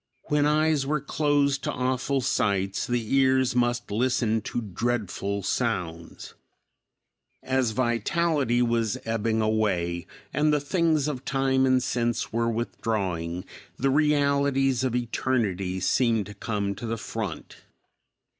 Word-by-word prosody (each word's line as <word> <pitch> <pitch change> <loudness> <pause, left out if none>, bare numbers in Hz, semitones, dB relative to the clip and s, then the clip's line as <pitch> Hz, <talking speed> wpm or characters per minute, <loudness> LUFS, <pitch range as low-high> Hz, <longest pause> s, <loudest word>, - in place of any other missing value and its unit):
When 150 0 +3
eyes 155 -1 +2
were 150 +1 +1
closed 145 -1 +1
to - - -1
awful 130 +2 0
sights, 100 -4 0
the 120 -2 -1
ears 130 -2 +3
must 120 -2 0
listen 115 -1 +1
to 115 - -3
dreadful 100 -2 -2
sounds. 90 -7 -3 1.1
As 130 -2 +1
vitality 125 +3 +1
was 115 -3 0
ebbing 115 0 0
away, 90 -6 0 0.3
and 150 0 +2
the 150 - +3
things 155 -1 +1
of 135 -4 -4
time 135 -1 +1
and 130 -1 +3
sense 120 -3 -1
were 115 0 +1
withdrawing, 95 -7 -2 0.3
the 135 +1 +1
realities 140 -3 +2
of 125 -2 0
eternity 110 -6 -1
seemed 115 +2 +2
to 105 - -9
come 100 -2 -2
to 115 +4 -7
the 115 +1 -2
front. 105 -4 -6
120 Hz, 125 wpm, -26 LUFS, 110-135 Hz, 1.1 s, When